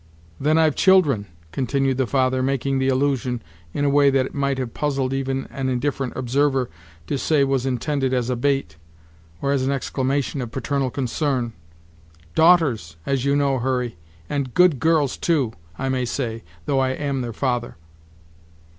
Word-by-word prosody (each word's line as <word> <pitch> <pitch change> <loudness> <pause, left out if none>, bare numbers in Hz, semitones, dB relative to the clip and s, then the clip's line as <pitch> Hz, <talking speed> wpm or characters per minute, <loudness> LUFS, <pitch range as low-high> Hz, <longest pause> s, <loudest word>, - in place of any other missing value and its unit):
"Then 155 +3 +2
I've 160 -2 +4
children!" 155 - +4 0.2
continued 135 +1 0
the 130 -2 +1
father, 130 -1 +1
making 135 0 0
the 130 - +1
allusion 130 -2 +1 0.3
in 145 - -1
a - - +3
way 140 0 +5
that 135 -1 +2
it - - -8
might 140 -1 0
have 125 -3 -4
puzzled 135 -3 -1
even 135 0 -2
an 135 -1 -2
indifferent 130 0 -1
observer 130 - +1 0.3
to 135 - -2
say 150 -1 +3
was 135 -1 0
intended 135 +1 0
as 125 -2 0
a - - 0
bait, 135 - 0 0.7
or 140 - +1
as 140 -2 +1
an 135 - +1
exclamation 135 0 -1
of 120 - -4
paternal 135 +2 -1
concern, 130 -2 -1 0.8
"daughters, 150 - +4
as 135 -1 0
you 140 0 +3
know, 140 -2 +2
Hurry, 125 -2 -1 0.3
and 140 -4 -3
good 180 -7 +5
girls 155 -2 +2
too, 140 -10 +1 0.2
I 135 - -2
may 130 -1 0
say, 115 -3 -3 0.2
though 135 - +1
I 130 0 +1
am 140 -1 -2
their 120 -1 -3
father." 120 -2 -2
135 Hz, 165 wpm, -22 LUFS, 125-140 Hz, 0.8 s, way